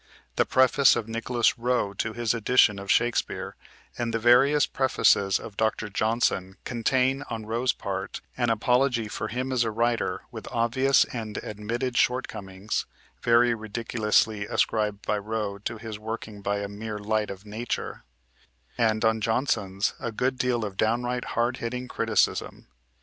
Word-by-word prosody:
The -, -, +2 dB
preface 130 Hz, +1 st, +5 dB
of 115 Hz, -, -3 dB
Nicholas 115 Hz, +1 st, 0 dB
Rowe 120 Hz, -4 st, 0 dB
to 110 Hz, +2 st, -3 dB
his 120 Hz, -1 st, 0 dB
edition 115 Hz, -3 st, +3 dB
of 100 Hz, 0 st, -9 dB
Shakespeare, 120 Hz, 0 st, 0 dB, 0.4 s
and 120 Hz, -1 st, -1 dB
the 115 Hz, -, 0 dB
various 130 Hz, +5 st, +5 dB
prefaces 100 Hz, -7 st, +2 dB
of 105 Hz, -, -10 dB
Dr. 110 Hz, -1 st, 0 dB
Johnson 105 Hz, -3 st, 0 dB
contain, 130 Hz, +3 st, +1 dB
on 110 Hz, -2 st, -5 dB
Rowe's 120 Hz, +3 st, +1 dB
part, 95 Hz, 0 st, -5 dB, 0.2 s
an 120 Hz, -2 st, 0 dB
apology 125 Hz, +1 st, +2 dB
for 110 Hz, -, -4 dB
him 130 Hz, +3 st, -3 dB
as 125 Hz, -2 st, +2 dB
a 115 Hz, -, -1 dB
writer 115 Hz, +2 st, 0 dB
with -, -, -8 dB
obvious 130 Hz, +4 st, +3 dB
and 110 Hz, -3 st, -6 dB
admitted 115 Hz, +4 st, -3 dB
shortcomings 100 Hz, -5 st, -1 dB, 0.3 s
(very 120 Hz, 0 st, +4 dB
ridiculously 110 Hz, -1 st, 0 dB
ascribed 105 Hz, -2 st, 0 dB
by 105 Hz, -, 0 dB
Rowe 105 Hz, -1 st, -3 dB
to 110 Hz, +2 st, -4 dB
his 110 Hz, -1 st, -7 dB
working 110 Hz, -1 st, -6 dB
by 100 Hz, +1 st, -1 dB
"a 100 Hz, -, -3 dB
mere 105 Hz, +1 st, -6 dB
light 105 Hz, +1 st, -1 dB
of 100 Hz, +1 st, -8 dB
nature"), 110 Hz, +3 st, -4 dB, 0.8 s
and, 110 Hz, -1 st, +2 dB
on 110 Hz, 0 st, +2 dB
Johnson's, 105 Hz, -4 st, 0 dB
a 120 Hz, -3 st, -3 dB
good 130 Hz, +4 st, 0 dB
deal 120 Hz, -3 st, +1 dB
of 95 Hz, -2 st, -7 dB
downright 120 Hz, +2 st, 0 dB
hard 120 Hz, +2 st, +1 dB
hitting 125 Hz, +2 st, -4 dB
criticism. -, -, 0 dB
115 Hz, 150 wpm, -26 LUFS, 105-120 Hz, 0.8 s, preface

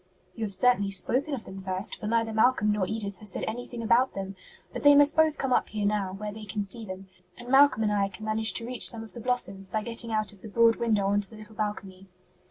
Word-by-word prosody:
"You 225 Hz, -, -3 dB
have 200 Hz, -, -2 dB
certainly 205 Hz, -1 st, +2 dB
spoken 255 Hz, -, 0 dB
of 240 Hz, -, -8 dB
them 190 Hz, 0 st, -9 dB
first, 190 Hz, +1 st, -3 dB
for 210 Hz, -, -6 dB
neither 225 Hz, 0 st, 0 dB
Malcolm 220 Hz, -1 st, +3 dB
nor 205 Hz, -3 st, 0 dB
Edith 205 Hz, -3 st, -3 dB
has 210 Hz, +1 st, -1 dB
said -, -, -3 dB
anything 240 Hz, +1 st, -5 dB
about 240 Hz, +3 st, +3 dB
them. 195 Hz, 0 st, -5 dB, 0.4 s
But -, -, -5 dB
they 290 Hz, 0 st, +7 dB
must 290 Hz, +1 st, +5 dB
both 315 Hz, -2 st, +3 dB
come 265 Hz, -2 st, 0 dB
up -, -, +1 dB
here 210 Hz, -1 st, -3 dB
now, 200 Hz, -2 st, 0 dB
where 210 Hz, +2 st, -5 dB
they 215 Hz, +1 st, -9 dB
can 205 Hz, 0 st, -3 dB
see 225 Hz, +4 st, -7 dB
them, 190 Hz, -1 st, -8 dB, 0.3 s
and 245 Hz, 0 st, -9 dB
Malcolm 270 Hz, -4 st, +5 dB
and 210 Hz, -1 st, +1 dB
I 200 Hz, -1 st, +1 dB
can 215 Hz, +3 st, -10 dB
manage 220 Hz, +1 st, +1 dB
to 230 Hz, -, 0 dB
reach 250 Hz, 0 st, +1 dB
some 225 Hz, -1 st, -6 dB
of 225 Hz, -, -12 dB
the 240 Hz, -, -8 dB
blossoms 205 Hz, -6 st, -2 dB
by 215 Hz, +2 st, -2 dB
getting 230 Hz, 0 st, -1 dB
out 215 Hz, -1 st, 0 dB
of 195 Hz, -, -15 dB
the -, -, -9 dB
broad 230 Hz, +2 st, +4 dB
window 215 Hz, -4 st, +1 dB
on 205 Hz, +1 st, +2 dB
to 200 Hz, -, -3 dB
the 220 Hz, -, -13 dB
little 215 Hz, 0 st, -12 dB
balcony." 195 Hz, -3 st, -5 dB
215 Hz, 260 wpm, -27 LUFS, 200-235 Hz, 0.4 s, they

